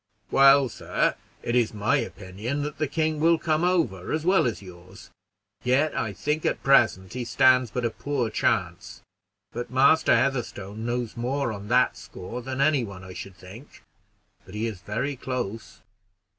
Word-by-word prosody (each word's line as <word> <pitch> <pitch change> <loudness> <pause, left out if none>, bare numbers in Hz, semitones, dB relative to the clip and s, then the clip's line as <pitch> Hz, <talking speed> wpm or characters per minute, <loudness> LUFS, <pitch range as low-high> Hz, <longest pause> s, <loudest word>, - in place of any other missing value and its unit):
"Well, 135 0 +6
sir, 110 - -1 0.3
it 120 - -1
is 120 -3 +1
my 105 0 +2
opinion 105 +9 -4
that 150 0 -6
the 155 - 0
king 155 +1 -1
will 165 +2 +4
come 155 0 0
over, 165 - 0
as 155 +1 -1
well 185 -7 +4
as 115 - -3
yours; 90 +1 -14 0.5
yet 135 +5 +2
I 110 - -1
think 150 +9 -2
at - - -1
present 110 -9 +3
he 125 0 -3
stands 130 +1 +4
but 120 +3 -3
a 115 - 0
poor 130 -5 -2
chance; - - -1 0.5
but 120 0 -5
Master 135 +2 +4
Heatherstone 115 -4 -2
knows 120 -1 -3
more 125 +2 -1
on 100 0 -8
that 125 +3 +3
score 115 +7 -8
than 130 +2 -4
any 145 -3 +3
one, 100 -4 -8
I 95 0 -10
should 95 0 -9
think; 95 +9 -14 0.6
but 95 - -13
he 110 +2 -2
is 105 -5 -5
very 120 +8 -3
close." 120 -4 -5
125 Hz, 170 wpm, -25 LUFS, 105-140 Hz, 0.6 s, Well